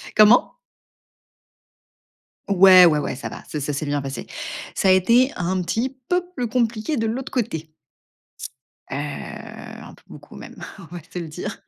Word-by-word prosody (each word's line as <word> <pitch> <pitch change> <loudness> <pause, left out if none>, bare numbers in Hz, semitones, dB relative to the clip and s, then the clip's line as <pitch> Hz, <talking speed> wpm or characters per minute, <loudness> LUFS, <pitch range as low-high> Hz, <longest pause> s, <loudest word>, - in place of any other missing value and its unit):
Comment? 215 +3 +6 2.0
Ouais, 185 -1 +8
ouais, 155 -3 +4
ouais, 140 - -3
ça 135 - -6
va. - - -10
C'est 150 - -4
Ça 145 +1 -3
s'est 145 - -3
bien 145 0 -1
passé. 135 0 -6 0.5
Ça 190 - +2
a - - +7
été 235 +9 +4
un 180 +1 -1
petit 245 +9 -2
peu 360 0 +2
plus 245 - -2
compliqué 235 +4 -1
de 225 -1 0
l'autre 250 +4 -4
côté 165 - -3 1.2
heu, 135 - -4 0.9
un - - -13
peu - - -20
beaucoup, - - -14
même, - - -11 0.2
on - - -11
va 170 - -7
se 180 - -5
le 170 - -6
dire. 160 +3 -7
190 Hz, 165 wpm, -22 LUFS, 160-235 Hz, 2.0 s, Ouais